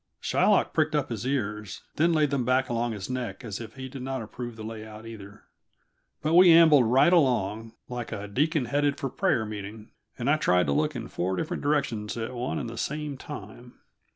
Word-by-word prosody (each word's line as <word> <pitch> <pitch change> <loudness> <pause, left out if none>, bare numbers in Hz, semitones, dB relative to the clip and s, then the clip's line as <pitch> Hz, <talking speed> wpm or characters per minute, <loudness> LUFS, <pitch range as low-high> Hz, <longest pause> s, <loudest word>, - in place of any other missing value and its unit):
Shylock - - +2
pricked - - +1
up - - 0
his 125 - -3
ears, 105 -7 -3
then 170 +3 +3
laid 155 -3 +2
them 140 -3 0
back 130 +1 +1
along 120 0 -1
his 100 -2 -6
neck 125 0 -4
as 110 -2 -5
if 115 +1 -9
he 130 -1 -6
did 130 0 -8
not 130 -1 -3
approve 120 +2 -7
the 110 - -9
layout, 110 0 -8
either. 105 -3 -11 0.8
But 155 +2 +1
we 180 0 +8
ambled 160 -6 +7
right 135 +9 +5
along, 115 - +1
like 125 -1 -5
a 105 -2 -5
deacon 145 +6 +1
headed 145 +3 +1
for 135 - -2
prayer 110 - +1
meeting, 105 +1 -8 0.3
and 120 - -3
I 150 +2 +4
tried 90 -11 +3
to - - -1
look 150 -1 0
in 120 - -5
four 95 +2 -2
different 155 - -3
directions 125 -8 -1
at 115 +2 -4
one 125 +1 -3
and - - -3
the 115 0 -7
same 150 -1 -3
time. 120 -3 -10
120 Hz, 205 wpm, -27 LUFS, 110-140 Hz, 0.8 s, we